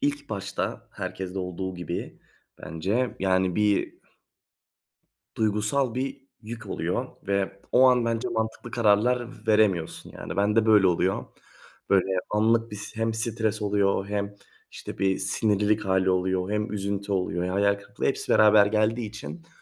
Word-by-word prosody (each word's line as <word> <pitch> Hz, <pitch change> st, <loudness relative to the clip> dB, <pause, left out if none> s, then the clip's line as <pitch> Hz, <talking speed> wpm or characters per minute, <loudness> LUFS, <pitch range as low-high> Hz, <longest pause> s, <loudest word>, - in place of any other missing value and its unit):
ilk 145 Hz, 0 st, -1 dB
başta 100 Hz, -1 st, -4 dB
herkeste 95 Hz, 0 st, -5 dB
olduğu 90 Hz, 0 st, -4 dB
gibi 90 Hz, 0 st, -6 dB, 0.4 s
bence, 100 Hz, +10 st, -2 dB
yani, 95 Hz, -1 st, +1 dB
bir 105 Hz, -1 st, +1 dB, 1.4 s
duygusal 110 Hz, +4 st, 0 dB
bir 135 Hz, +1 st, -3 dB, 0.2 s
yük 115 Hz, +1 st, -8 dB
oluyor. -, -, -2 dB, 0.2 s
Ve 100 Hz, 0 st, -1 dB
o 130 Hz, +1 st, +7 dB
an 125 Hz, -2 st, +3 dB
bence 115 Hz, -1 st, -1 dB
mantıklı 110 Hz, +2 st, -3 dB
kararlar 120 Hz, +1 st, +1 dB
veremiyorsun. 105 Hz, -7 st, +1 dB
Yani, 80 Hz, -, -7 dB
ben 105 Hz, +2 st, +2 dB
de 115 Hz, -, +4 dB
böyle 105 Hz, -3 st, +6 dB
oluyor. 90 Hz, +2 st, +1 dB, 0.7 s
Böyle 95 Hz, -2 st, +5 dB, 0.3 s
anlık 115 Hz, +2 st, +2 dB
bir 105 Hz, -, -6 dB
s 100 Hz, -, -9 dB
hem 115 Hz, 0 st, 0 dB
stres 110 Hz, -1 st, -1 dB
oluyor 100 Hz, -1 st, +1 dB
hem 100 Hz, 0 st, -2 dB, 0.4 s
işte -, -, -9 dB
bir 95 Hz, -1 st, +1 dB
sinirlilik 105 Hz, +2 st, +1 dB
hâli 95 Hz, -1 st, +2 dB
oluyor 95 Hz, +1 st, 0 dB
hem 105 Hz, +1 st, -1 dB
üzüntü 100 Hz, 0 st, -3 dB
oluyor. 90 Hz, -2 st, -1 dB
Hayal 100 Hz, +2 st, +2 dB
kırıklığı 100 Hz, 0 st, -7 dB
hepsi -, -, 0 dB
beraber 105 Hz, -1 st, +6 dB
geldiği 110 Hz, +2 st, +1 dB
için 110 Hz, +10 st, -9 dB
105 Hz, 140 wpm, -26 LUFS, 95-110 Hz, 1.4 s, o